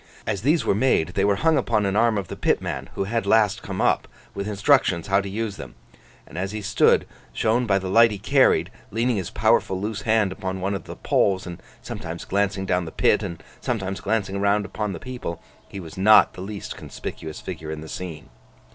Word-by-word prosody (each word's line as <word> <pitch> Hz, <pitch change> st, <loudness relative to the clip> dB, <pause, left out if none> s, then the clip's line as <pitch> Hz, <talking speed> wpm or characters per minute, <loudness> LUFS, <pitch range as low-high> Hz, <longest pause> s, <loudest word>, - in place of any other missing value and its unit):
As 95 Hz, -, -2 dB
these 145 Hz, +1 st, +2 dB
were -, -, +3 dB
made, 100 Hz, -7 st, +2 dB
they 95 Hz, +2 st, -1 dB
were 100 Hz, 0 st, +3 dB
hung 160 Hz, +6 st, +3 dB
upon 105 Hz, -4 st, +1 dB
an 100 Hz, 0 st, 0 dB
arm 115 Hz, 0 st, +3 dB
of 100 Hz, -3 st, -3 dB
the -, -, -6 dB
pitman -, -, -1 dB
who -, -, -1 dB
had 110 Hz, 0 st, -2 dB
last 105 Hz, -1 st, +3 dB
come -, -, -6 dB
up, -, -, +2 dB, 0.3 s
with 100 Hz, +1 st, -4 dB
instructions 105 Hz, -, +2 dB
how 100 Hz, 0 st, +2 dB
to 100 Hz, -, -6 dB
use 105 Hz, 0 st, -3 dB
them: -, -, -9 dB, 0.5 s
and 85 Hz, -, -8 dB
as 95 Hz, +2 st, -3 dB
he 110 Hz, -, -4 dB
stood, 100 Hz, -, +3 dB, 0.3 s
shown 120 Hz, +2 st, +1 dB
by 100 Hz, -2 st, +3 dB
the 95 Hz, -1 st, -3 dB
light 115 Hz, +5 st, +6 dB
he 105 Hz, -, -4 dB
carried, 100 Hz, -, +3 dB, 0.2 s
leaning 115 Hz, +2 st, 0 dB
his 95 Hz, -4 st, -3 dB
powerful 95 Hz, -, +2 dB
loose 105 Hz, +2 st, -3 dB
hand 110 Hz, -3 st, +2 dB
upon 95 Hz, -1 st, -4 dB
one 95 Hz, +2 st, -1 dB
of 95 Hz, -, -5 dB
the -, -, -8 dB
poles, 95 Hz, -2 st, +1 dB
and 85 Hz, -2 st, -8 dB, 0.2 s
sometimes 85 Hz, +1 st, -6 dB
glancing 100 Hz, 0 st, 0 dB
down 90 Hz, -2 st, 0 dB
the 80 Hz, -, -7 dB
pit, -, -, +3 dB
and 85 Hz, -2 st, -6 dB, 0.2 s
sometimes 95 Hz, -5 st, -3 dB
glancing 100 Hz, -2 st, -1 dB
round 100 Hz, +1 st, +2 dB
upon 105 Hz, +1 st, -3 dB
the -, -, -6 dB
people, 125 Hz, -10 st, -6 dB, 0.3 s
he 100 Hz, -, -7 dB
was 85 Hz, 0 st, -9 dB
not 105 Hz, +3 st, +6 dB
the -, -, -9 dB
least 100 Hz, +1 st, -6 dB
conspicuous 80 Hz, -1 st, -7 dB
figure 80 Hz, -, -7 dB
in 80 Hz, 0 st, -5 dB
the 80 Hz, -, -9 dB
scene. 80 Hz, -4 st, -7 dB
100 Hz, 215 wpm, -24 LUFS, 95-110 Hz, 0.5 s, light